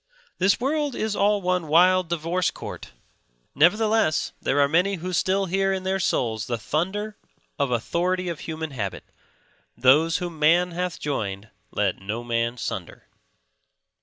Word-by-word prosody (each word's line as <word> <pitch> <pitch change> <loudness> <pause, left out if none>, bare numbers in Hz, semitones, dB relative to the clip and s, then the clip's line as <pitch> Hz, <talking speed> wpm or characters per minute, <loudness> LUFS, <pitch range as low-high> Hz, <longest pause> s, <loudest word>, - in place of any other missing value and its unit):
This 190 +2 +3
world 290 +1 -1
is 215 -1 -2
all 205 0 +2
one 180 -2 0
wild 180 +3 +4
divorce 170 +2 0
court; - - -8 0.6
nevertheless, 210 +1 +3
there 145 - +1
are 140 - +5
many 180 +6 +2
who 180 +1 -5
still 190 +3 +1
hear 195 +1 +1
in 190 -1 -2
their 190 +1 0
souls 115 - 0
the 120 - -1
thunder 190 - -2 0.4
of 140 -2 +1
authority 180 +10 -1
of 170 -3 -4
human 160 -1 -5
habit; 105 -8 -4 0.7
those 150 +6 +4
whom 175 -3 -6
Man 170 +4 +4
hath 180 -1 -3
joined 105 -8 -3 0.2
let 100 -3 0
no 110 +5 -4
man 115 0 -1
sunder. - - -5
170 Hz, 145 wpm, -24 LUFS, 140-190 Hz, 0.7 s, are